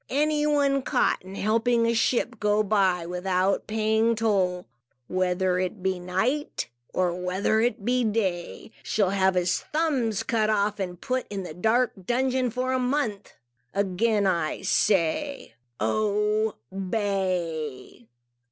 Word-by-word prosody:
Any 300 +2 +1
one 280 -2 +2
caught - - +1
in 190 +1 -10
helping 230 +3 +2
a 230 - +2
ship 235 0 0
go 210 0 +2
by 190 -4 +2
without 185 +2 0
paying 220 +1 +2
toll, 190 -5 0 0.4
whether 185 0 0
it 185 +1 -3
be 190 -1 0
night, 190 - -1 0.2
or 180 -2 +1
whether 180 +4 0
it 225 -3 -1
be 250 0 +2
day, 205 -5 -2
shall 200 -3 +1
have 190 -1 +2
his 180 0 +1
thumbs 260 -10 -1
cut 225 -3 +1
off 210 0 +1
and 185 -2 -2
be - - -15
put 255 -1 -1
in 200 -2 -4
the 165 - -7
dark 225 +8 +2
dungeon 255 +3 +1
for 255 +3 -1
a 260 - +1
month. 250 -5 -1 0.4
Again 200 +2 +1
I 170 -5 0
say, 200 - +1 0.3
Obey!" 190 - -1
210 Hz, 135 wpm, -26 LUFS, 185-235 Hz, 0.4 s, one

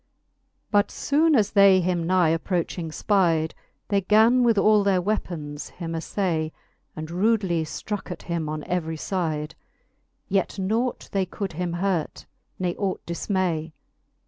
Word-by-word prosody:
LIII. - - -48 0.7
But 205 -2 +4
Ibone 310 +2 +2
as 205 -2 +2
they 200 -2 +6
him 175 -2 0
nigh 180 -2 +3
approching 165 0 -1
Ipide, 165 -3 +1 0.4
They 200 -1 +2
gan 220 +6 +5
with 235 -3 +3
all 210 0 +5
their 195 -2 +3
weapons 170 -7 -3
him 170 -2 -7
aflay. 165 -1 -1 0.4
And 155 +1 -6
rudely 190 -3 +1
ftroke 200 +6 -5
at 180 - -7
him 170 -3 -3
on 155 0 -4
every 160 -3 -2
lide: 160 -4 -1 0.7
Yet 195 +1 0
nought 225 +6 -1
they 195 -2 0
could 195 -1 -5
him 175 +1 -3
hurt, 175 -2 -2 0.3
ne 180 -2 -1
ought 195 -2 -2
difinay. 170 -3 -1
180 Hz, 145 wpm, -25 LUFS, 165-200 Hz, 0.7 s, they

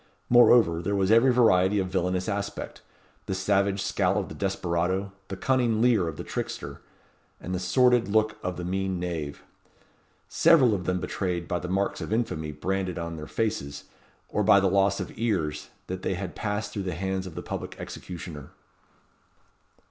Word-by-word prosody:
Moreover, 120 -8 +6
there 100 +4 -1
was 95 0 +2
every 115 +4 +6
variety 105 -5 +4
of 95 -2 0
villainous 90 0 0
aspect; 100 -1 -4 0.5
the 95 - -1
savage 100 0 +1
scowl 95 0 +1
of 100 - -2
the - - -7
desperado, 95 0 -1 0.2
the 95 - -6
cunning 125 -3 +1
leer 115 -7 +3
of 80 -2 -5
the - - -5
trickster, - - -5 0.6
and 90 - -5
the 90 - -1
sordid 125 +4 +3
look 110 +1 +2
of 90 0 -3
the 90 - -5
mean 95 0 -1
knave. 80 -5 -4 0.8
Several 155 -9 +5
of 90 -3 -3
them 90 0 0
betrayed, 90 -2 -3
by 90 - -1
the 90 - -6
marks 95 +2 -1
of - - -5
infamy 80 -9 -1
branded 95 +4 -2
on 85 -1 -4
their 75 -1 -7
faces, 85 -12 -2 0.4
or 105 - -1
by 100 -1 +6
the 95 - +2
loss 100 0 +2
of - - -5
ears, 80 -10 -1 0.2
that 95 0 -5
they 95 - -1
had 90 -1 -5
passed 105 0 -3
through 100 - -3
the 90 -3 -3
hands 95 +1 -2
of 85 - -10
the - - -5
public - - -5
executioner. 80 -6 -8
95 Hz, 175 wpm, -27 LUFS, 90-105 Hz, 0.8 s, Moreover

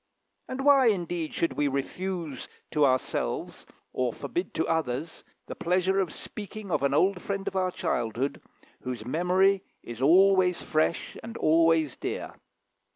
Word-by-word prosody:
And 265 +1 -4
why, 275 -3 +6
indeed, 175 -6 0
should 170 - 0
we 145 - +1
refuse 155 +1 -3 0.2
to 150 -3 +4
ourselves, 130 -1 -2 0.3
or 125 -1 0
forbid 175 +9 -4
to 160 - +1
others, 160 -1 -2 0.2
the - - -6
pleasure 185 +2 +1
of 185 -5 0
speaking 210 -1 -7
of - - +1
an 140 0 +1
old 185 +3 +2
friend 200 -1 -4
of - - -3
our 185 -1 +1
childhood, 135 - -2 0.4
whose 125 -4 -5
memory 185 +7 +2 0.2
is 120 +1 -8
always 185 +4 +5
fresh 155 +1 0
and 230 +1 -8
always 160 -2 +3
dear? - - -4
170 Hz, 145 wpm, -27 LUFS, 145-190 Hz, 0.4 s, why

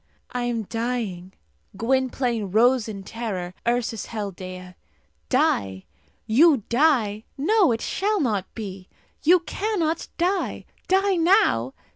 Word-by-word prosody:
I 245 -1 -2
am 235 -2 -1
dying!" 225 -5 -3 0.4
Gwynplaine 245 -3 0
rose 240 +3 +4
in 195 -2 -7
terror. 190 -5 -5
Ursus 235 -3 -1
held 205 -4 -5
Dea. 185 0 -9 0.6
"Die! 100 - +1 0.4
You 275 +1 +5
die! 235 -6 +2
No; 370 - +3
it 225 - -1
shall 415 +2 0
not 210 - -1
be! 195 -4 -7 0.3
You 350 +3 +5
cannot 345 -4 -2
die! 365 +3 -1 0.2
Die 385 0 +3
now! 330 - +3
235 Hz, 115 wpm, -24 LUFS, 200-320 Hz, 0.6 s, You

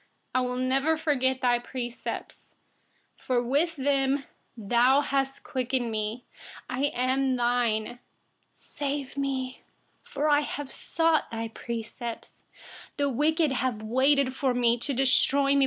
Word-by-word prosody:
93I 255 - +4
will 250 0 -3
never 270 +5 +1
forget 260 -4 0
your 240 -1 +3
precepts, 240 -1 -6 0.6
for 245 -2 0
with 295 +7 +1
them, 275 0 +1 0.3
you 205 -3 -9
have 270 +2 +3
revived 255 -1 -2
me. 225 0 -3 0.5
94I 270 +3 0
am 260 +1 +1 0.5
yours. 240 - -9 0.6
Save 280 -2 -4
me, 265 -2 -3 0.4
for 290 +2 -2
I 295 -1 +4
have 290 -1 -5
sought 325 -1 +1
your 225 0 -4
precepts. 235 +1 -7 0.6
95The 285 -2 +1
wicked 310 +2 +2
have 245 -4 -1
waited 260 +3 +2
for 265 -3 0
me, 240 -1 +3
to 285 - -1
destroy 275 +2 +4
me. 280 - +3
265 Hz, 125 wpm, -27 LUFS, 245-280 Hz, 0.6 s, 93I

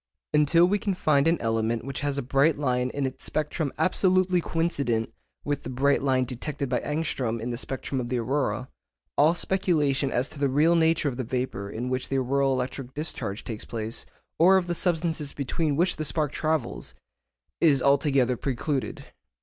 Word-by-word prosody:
Until 150 +3 +5
we 205 +2 +1
can 195 -2 -1
find 150 -4 +2
an 165 0 +2
element 115 +1 -1
which 135 -1 -4
has 145 -1 -1
a 140 - -1
bright 140 +4 +2
line 125 -3 0
in 140 +1 -2
its 130 - -5
spectrum 150 -1 -1
absolutely 185 -1 +2
coincident 140 -10 -1 0.3
with 145 -1 -2
the - - -7
bright 135 +3 +2
line 130 -2 +2
detected 135 +2 -4
by 125 - +1
Ångström 140 -7 -2
in 120 +2 -4
the - - -2
spectrum 135 +1 -3
of 120 - -5
the 125 - 0
aurora, 125 -1 -1 0.5
all 155 +4 +4
speculation 150 -8 +1
as 125 +2 0
to 145 - -11
the 140 -1 +2
real 150 +6 +4
nature 165 -2 +3
of 125 -4 -2
the 130 - -2
vapour 125 -5 -3
in 120 +4 -4
which 130 0 -2
the 135 - 0
auroral 135 +1 +1
electric 130 0 -4
discharge 140 -9 -3
takes 110 -3 -5
place, 110 0 -5 0.3
or 185 +4 +7
of 185 - 0
the 175 - -2
substances 165 -4 -1
between 145 +2 -1
which 180 +4 +1
the 155 - -2
spark 150 -1 0
travels, 155 -6 -2 0.6
is 150 -5 +4
altogether 140 -2 +3
precluded. 135 +2 -3
140 Hz, 180 wpm, -26 LUFS, 125-160 Hz, 0.6 s, or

